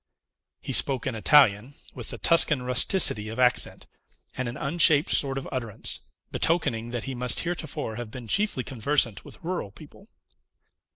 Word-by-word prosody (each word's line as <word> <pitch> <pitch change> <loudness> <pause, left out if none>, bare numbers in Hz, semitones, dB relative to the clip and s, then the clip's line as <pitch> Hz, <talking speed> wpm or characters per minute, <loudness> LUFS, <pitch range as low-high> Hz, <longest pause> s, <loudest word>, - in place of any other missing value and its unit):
He - - -6
spoke 130 -3 +2
in 130 - -3
Italian, 120 0 +3 0.2
with - - -8
the - - -7
Tuscan 150 -5 +3
rusticity 125 - +2
of 110 - -8
accent, 125 -1 +1 0.5
and 130 -1 -4
an 120 +3 -6
unshaped 150 +1 +3
sort 135 -1 +2
of 135 - -6
utterance, 115 -6 -2 0.2
betokening 120 -9 -1
that 120 -1 -5
he 135 - -6
must 125 -1 -1
heretofore 160 -10 -5
have 120 -2 -7
been 120 0 -10
chiefly 200 - -1
conversant 125 -2 0
with - - -15
rural 175 - -4
people. 155 - -17
130 Hz, 155 wpm, -25 LUFS, 120-150 Hz, 0.5 s, Italian